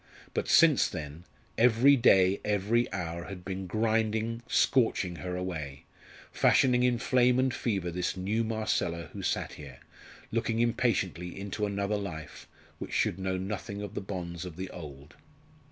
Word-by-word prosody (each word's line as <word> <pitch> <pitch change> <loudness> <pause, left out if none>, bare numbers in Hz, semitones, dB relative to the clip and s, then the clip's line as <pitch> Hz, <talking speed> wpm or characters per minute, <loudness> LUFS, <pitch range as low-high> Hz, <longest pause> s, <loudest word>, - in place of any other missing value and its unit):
But - - -1
since 160 -4 +5
then 80 -1 -7 0.3
every 125 +4 +6
day, 95 -6 +4
every 105 +3 +1
hour 85 -3 -4
had 95 -3 -9
been 95 -1 -4
grinding, 110 +2 0
scorching 105 -8 +2
her 90 +1 -4
away 80 -7 -5 0.5
fashioning 125 -2 +4
in 125 -1 +3
flame 125 +1 +3
and 130 -1 +2
fever 95 -9 -2
this 90 +2 -2
new 105 +5 0
Marcella 110 -6 -2
who - - -6
sat - - -2
here, 70 -4 -11 0.5
looking 115 0 -1
impatiently 95 -7 0
into 100 +1 -3
another 100 +1 -1
life, 85 -6 -7 0.3
which - - -7
should 90 - +1
know 95 0 -1
nothing 100 +1 -5
of 105 -1 -7
the - - -4
bonds 90 -3 -5
of 90 -3 -8
the 95 +2 -6
old. 75 -4 -10
100 Hz, 150 wpm, -29 LUFS, 90-115 Hz, 0.5 s, every